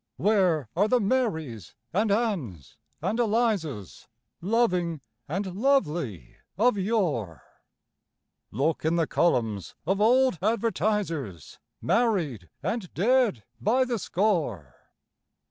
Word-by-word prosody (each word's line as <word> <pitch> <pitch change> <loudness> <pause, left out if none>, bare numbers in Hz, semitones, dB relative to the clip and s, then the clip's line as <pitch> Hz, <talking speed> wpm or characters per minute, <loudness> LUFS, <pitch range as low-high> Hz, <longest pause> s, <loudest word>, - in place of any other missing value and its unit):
Where 185 - +2
are 200 +5 +3
the 250 +3 +3
Marys, 160 - -1 0.2
and 210 +3 +1
Anns, 170 - -2 0.3
and 225 - -1
Elizas, 205 - -1 0.3
Loving 180 -5 +1 0.3
and 185 +3 -3
lovely 175 - 0 0.2
of 235 +3 +3
yore? 170 - -1 1.1
Look 145 +8 -1
in 160 +2 +1
the 165 -1 +2
columns 115 - 0
of 195 +4 0
old 250 - +4
Advertisers, 205 - -1 0.2
Married 170 - 0
and 200 +1 -3
dead 225 - +2 0.2
by 250 - +2
the 240 -3 -2
score. 160 - -1
185 Hz, 100 wpm, -26 LUFS, 145-225 Hz, 1.1 s, old